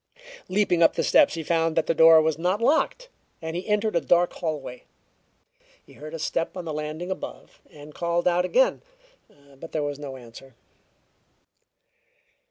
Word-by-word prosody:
Leaping 185 -3 +1
up 165 - +5
the - - 0
steps, - - +4
he 165 - -5
found 165 0 0
that 165 - +1
the - - +1
door 160 0 +7
was 160 -1 -1
not 180 +4 0
locked, 320 - +1 0.3
and 160 0 -6
he 180 - -5
entered 210 -1 0
a 170 - +2
dark 175 +5 +2
hallway. 150 -7 -5 1.0
He - - -18
heard 155 +2 -9
a - - -4
step 165 +2 -3
on 180 - -6
the 160 - -4
landing 155 +4 -5
above, 190 - -8
and 150 0 -13
called 170 +2 -1
out 180 0 +2
again, - - +2 0.8
but 165 - -11
there 155 - -1
was 145 -1 -4
no 140 -2 -7
answer. 125 +1 -14
165 Hz, 170 wpm, -25 LUFS, 155-180 Hz, 1.0 s, door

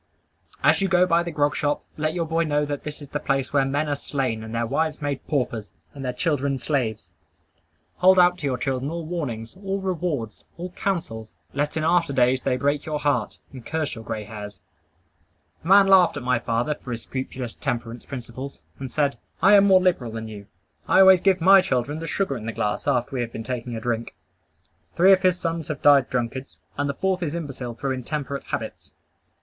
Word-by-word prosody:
As - - +4
you 195 - +2
go 180 -1 +4
by 170 -1 +3
the 170 - -4
grog 145 -2 +1
shop, 145 -1 -1
let 155 +2 -1
your 170 -2 0
boy 165 +1 +1
know 150 -2 +1
that 145 -1 -4
that 150 0 -7
is - - -10
the 145 - -3
place 135 -1 -1
where 140 -2 +3
men 145 +3 0
are 145 - 0
slain, 130 -6 -2
and 110 +1 -7
their 115 0 0
wives 155 +5 -1
made 145 -2 -4
paupers, 120 -7 -1 0.2
and 140 - -8
their 125 - -1
children 140 -2 0
slaves. 110 - -2 0.8
Hold 185 +1 +5
out 180 0 +5
to 145 - -2
your 130 -2 0
children 135 0 -2
all 170 0 -4
warnings, 135 -9 -4
all 195 0 -3
rewards, 175 - -3
all 180 +1 -6
counsels, 165 - -3 0.2
lest 145 +3 -1
in 155 - -1
after 165 -2 +2
days 130 0 +3
they 125 - 0
break 145 +2 0
your 155 -1 -2
heart, 145 -1 0 0.2
and 130 -3 -9
curse 160 +1 -2
your 115 -3 -8
gray 110 -1 -4
hairs. 105 -2 -9 1.0
A - - -8
man 195 +1 +7
laughed 190 -5 +5
at 145 - -5
my 125 -1 +2
father 120 +6 0
for 135 - -12
his 115 -1 -4
scrupulous 130 -2 -5
temperance 120 -1 -4
principles, 130 +1 -7 0.2
and 135 -1 -5
said 145 +1 0 0.2
"I 195 +2 +6
am 200 -1 +7
more 190 -1 +7
liberal 155 -11 +1
than 110 0 -5
you. 105 -2 -10 0.4
I - - +6
always 190 -2 +7
give 190 -1 +3
my 190 +2 +8
children 145 -3 -1
the 165 - -5
sugar 175 -3 -1
in 115 -2 -6
the 115 - -3
glass 105 0 -2
after 125 +2 +1
we 125 - 0
have 115 -1 -3
been 115 - -6
taking 120 0 -4
a - - -3
drink." 115 0 -3 0.8
Three 185 +3 +7
of 185 - +3
his 185 -1 +2
sons 165 -1 -3
have 150 -3 -5
died 140 -3 +6
drunkards; 125 +2 -3 0.2
and 145 0 -1
the 140 - -2
fourth 190 +2 0
is 165 -2 -2
imbecile 135 -7 -5
through 135 +2 -3
intemperate 140 +2 -4
habits. - - -6
145 Hz, 210 wpm, -24 LUFS, 125-165 Hz, 1.0 s, my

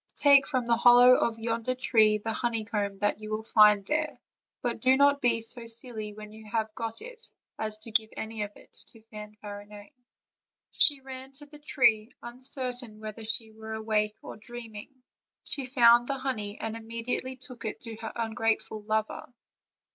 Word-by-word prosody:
take 280 -2 +6
from 255 -4 -1
the 235 0 +3
hollow 245 +1 +8
of 235 -2 +1
yonder 230 +2 -2
tree 220 -4 +4
the 225 +2 -4
honeycomb 215 -4 -2
that 205 +1 0
you 215 0 -8
will 215 0 -3
find 210 -2 +5
there; 300 -2 -1 0.4
but 240 -2 -1
do 255 +3 +4
not 285 0 +4
be 235 -2 +2
so 230 +1 -3
silly 225 -2 -3
when 210 0 -11
you 220 +1 -12
have 220 -1 -1
got 225 0 -4
it 485 -1 -9 0.3
as 215 -1 -3
to 215 +1 -12
give 220 0 +3
any 220 0 -5
of 205 - -2
it - - -19
to 225 - -2
Fanfarinet." 210 -1 -10 0.8
She 285 -2 +3
ran 265 0 -9
to 290 +2 -14
the 295 0 -15
tree, 230 -7 +2
uncertain 245 -2 -3
whether 215 +1 -7
she 220 0 -1
were 220 0 -7
awake 215 -1 0
or - - -8
dreaming. 225 -1 -9 0.5
She 275 -3 -3
found 240 -2 +5
the 275 - -1
honey 225 -6 -4
and 225 0 -4
immediately 230 +3 -4
took 255 -1 -11
it 220 - -5
to 230 -2 -6
her 225 0 -6
ungrateful 225 -1 -1
lover. 215 +4 -2
225 Hz, 170 wpm, -28 LUFS, 215-250 Hz, 0.8 s, hollow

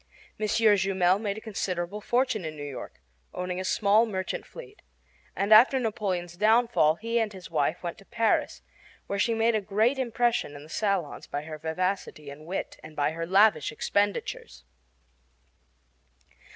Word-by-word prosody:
M. 215 - 0
Jumel 195 -4 +3
made 205 -1 -3
a - - -7
considerable 195 -2 -3
fortune 245 -3 0
in 155 -1 -5
New 145 - -7
York, 135 - -8 0.4
owning 180 0 -3
a - - -3
small 210 +4 +3
merchant 190 -3 -4
fleet; 460 -4 -12 0.5
and 200 +2 +3
after 250 +5 +7
Napoleon's 190 -7 -2
downfall 220 -5 +3
he 230 +5 -1
and 220 -2 -1
his 185 -4 -11
wife 155 +3 0
went 170 -1 -5
to 195 - -17
Paris, 230 0 0 0.4
where 200 - -3
she 230 +2 +2
made 225 +1 +2
a 215 - +1
great 215 +7 +1
impression 240 - 0
in 145 - -10
the 155 - -15
salons 195 -5 -2
by 145 - -4
her 155 0 -8
vivacity 160 -2 -3
and 150 +3 -12
wit 185 - -4
and 155 0 -11
by 145 0 +1
her 165 +1 -5
lavish 205 +4 +4
expenditures. 200 - -2
200 Hz, 160 wpm, -27 LUFS, 170-220 Hz, 0.5 s, after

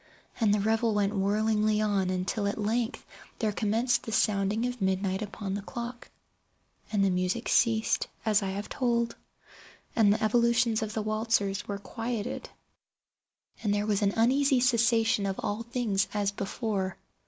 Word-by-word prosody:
And 220 -3 +3
the 210 - +3
revel 220 +1 +1
went 205 0 +1
whirlingly 215 +1 +1
on, 200 -3 +1
until 185 +3 -1
at 200 - -2
length 225 +2 -1 0.3
there 220 -2 0
commenced 225 +4 +1
the 225 - -7
sounding 210 +1 +1
of 245 -2 -4
midnight 190 +1 0
upon 205 -1 -5
the 200 - -3
clock. 240 +3 -7 0.8
And 205 -2 +2
then 195 - +3
the - - 0
music 185 +6 -1
ceased, 225 -2 +2 0.2
as 215 -1 +3
I 195 - -2
have 200 +2 -4
told; 235 -2 0 0.8
and 215 -3 +5
the 215 - 0
evolutions 235 +1 +3
of 215 -1 -4
the 220 - -1
waltzers 215 -2 0
were 200 - -3
quieted; 230 +2 -4 1.1
and 210 - 0
there 205 0 +1
was 210 -1 +1
an 200 -1 +2
uneasy 265 +3 +3
cessation 230 -4 +3
of 195 - -1
all 205 +2 -2
things 230 -5 0
as 205 -1 +1
before. 200 -1 -3
215 Hz, 160 wpm, -28 LUFS, 200-230 Hz, 1.1 s, and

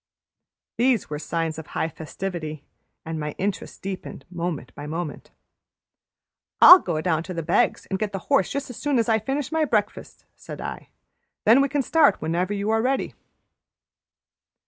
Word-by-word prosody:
These 240 -8 +2
were 150 - -3
signs 165 0 -2
of 160 - -9
high - - -2
festivity, 155 -1 -6 0.4
and 160 0 -4
my 150 -1 -4
interest 195 0 -4
deepened 190 -7 -6
moment 170 -7 -4
by 145 - -8
moment. 160 0 -5 1.3
"I'll 360 - +11
go 155 - -2
down 165 -2 +1
to 180 +2 -7
the 165 - -3
Beggs' 170 - +1
and 190 - -3
get 215 -2 -2
the 195 - -3
horse 190 - +2
just 280 -2 -4
as 245 - -10
soon 290 -3 0
as 230 - +2
I 220 -1 +3
finish 270 +5 -3
my 320 0 +1
breakfast," 220 -8 -2
said - - -9
I. - - -7 0.6
"Then 230 +6 +7
we 275 - +1
can 285 0 0
start 315 +2 +4
whenever 170 +4 -1
you 205 +1 -1
are 225 0 +2
ready." 260 +3 -1
190 Hz, 170 wpm, -24 LUFS, 160-240 Hz, 1.3 s, I'll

